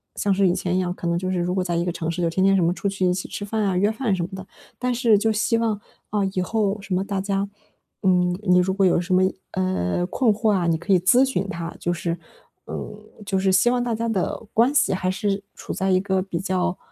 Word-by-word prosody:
像 205 - 0
是 195 0 +3
以 175 - +3
前 180 0 -1
一 - - +2
样 180 -1 -1
可 175 - -5
能 170 0 +1
就 185 +1 -2
是 185 - 0
如 175 +1 -1
果 185 - +1
在 175 -2 -2
一 170 - +1
个 175 - 0
城 165 -1 -4
市 170 +1 -2
就 170 - +2
天 185 +3 0
天 195 0 +5
什 185 - +3
么 170 - +3
出 200 - -3
去 195 -1 -2
一 180 - +3
起 180 - -4
吃 - - -6
饭 215 +1 -1
啊， 195 -2 +1
约 205 +3 +3
饭 220 -3 0
什 180 - -3
么 170 - -4
的。 190 0 -7 0.3
但 250 0 0
是 230 -3 +4
就 220 +2 +1
希 225 +2 +1
望， 225 -3 0 0.3
啊， 210 - 0
以 185 - 0
后 210 +1 0
什 195 -1 -5
么 185 - +1
大 200 -1 -3
家 195 0 -1 0.5
嗯， 180 -1 +3
你 180 -2 +4
如 190 +1 +1
果 195 0 +2
有 175 - +4
什 180 +1 -2
么， 185 - +4 0.3
呃， 180 - 0
困 240 +3 +2
惑 215 +1 +1
啊， 185 -4 +1
你 165 -1 +2
可 170 +5 -4
以 185 - +5
咨 245 +9 +5
询 200 -8 -1
他， 170 -2 -5
就 175 - -1
是 170 0 -3 0.5
嗯， - - -4 0.5
就 195 -1 0
是 190 0 +2
希 195 +6 +4
望 250 - +1
大 240 -2 -1
家 230 +1 -2
的 205 +2 -2
关 240 +5 +3
系 285 - +3
还 185 0 -1
是 195 +1 -1
处 - - -6
在 190 0 -1
一 185 - +4
个 190 -1 0
比 185 -3 -4
较， 185 -1 -1
190 Hz, 295 characters per minute, -23 LUFS, 180-205 Hz, 0.5 s, 天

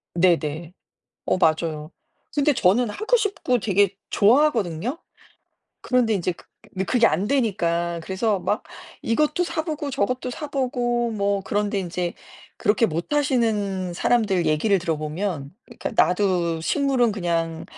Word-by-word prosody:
네네. 170 -1 +1 0.5
어 - - +2
맞아요. 155 -2 0 0.4
근데 290 0 +3
저는 210 +4 +3
하고 435 - +1
싶고 395 - 0
되게 200 -1 +2
좋아하거든요? 230 - +2 0.8
그런데 245 -3 +1
인제 180 -2 -1
그 170 - -18 0.3
느 190 0 -1
그게 240 +1 +3
안 185 +7 0
되니까 170 -10 0
그래서 190 +3 -1
막 210 - -1 0.4
이것도 300 +8 +1
사보고 315 -3 -3
저것도 255 0 -1
사보고 245 -4 -1
뭐 200 -1 0
그런데 205 0 -1
인제 175 -1 -3 0.4
그렇게 210 +3 +2
못하시는 205 - 0
사람들 195 -3 +1
얘기를 160 +6 +2
들어보면 155 -1 -3
그니까 235 - -6
"나도 180 -5 +2
식물은 255 - +1
그냥 165 -4 -2
200 Hz, 285 characters per minute, -23 LUFS, 175-245 Hz, 0.8 s, 근데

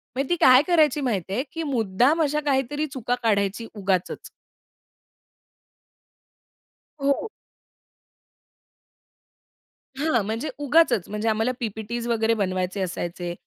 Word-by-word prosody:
म्हणजे 270 +1 -2
ती 350 - +3
काय 255 +1 +8
करायची 310 -5 +3
माहिती 195 - -2
आहे, 245 +6 0
की 330 - -3
मुद्दाम 250 - +1
अशा 300 0 0
काहीतरी 285 +2 0
चुका 245 -1 -1
काढायची 205 0 0
उगाचच. 190 -4 -2 2.7
हो 280 0 +3
हो. 445 - -6 2.7
हां, 285 -5 +1
म्हणजे 225 +8 -3
उगाचच 285 - +3
म्हणजे 210 +2 -1
आम्हाला 220 +3 +1
पी-पी-टीस 230 +1 -4
वगैरे 225 -1 +1
बनवायचे 185 -2 -2
असायचे. 175 -1 -4
235 Hz, 105 wpm, -24 LUFS, 200-275 Hz, 2.7 s, काय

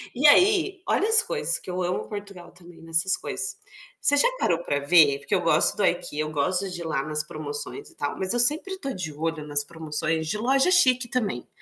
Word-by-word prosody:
E 275 +5 +4
aí 380 +3 +3
olha 415 - +1
as 450 +1 +8
coisas 470 -1 -1
que - - -12
eu 180 +1 -3
amo 180 0 -3
Portugal, 200 -4 -9
também, 175 -1 -17
nessas 165 +3 +1
coisas. - - -5 0.4
Você 285 - +3
já 285 - +6
parou 170 0 0
pra 145 - -2
ver? 145 -1 +4
Porque 140 - -6
eu - - 0
gosto - - +3
do - - +1
IKEA, 150 +1 -2
eu 155 - -4
gosto 180 +6 -1
de 175 -1 -7
ir - - -5
lá 155 -4 -2
nas 150 0 -1
promoções 145 -1 -6
e - - -20
tal, 145 - -4
mas 190 +3 -1
eu 245 - 0
sempre 310 +10 +2
tô 275 - -5
de 160 -7 -5
olho 160 0 -4
nas 145 -1 0
promoções 160 0 -3
de 210 - -1
loja 270 +9 +2
chique, 255 -9 +4
também. 210 - -3
180 Hz, 220 wpm, -24 LUFS, 155-255 Hz, 0.4 s, as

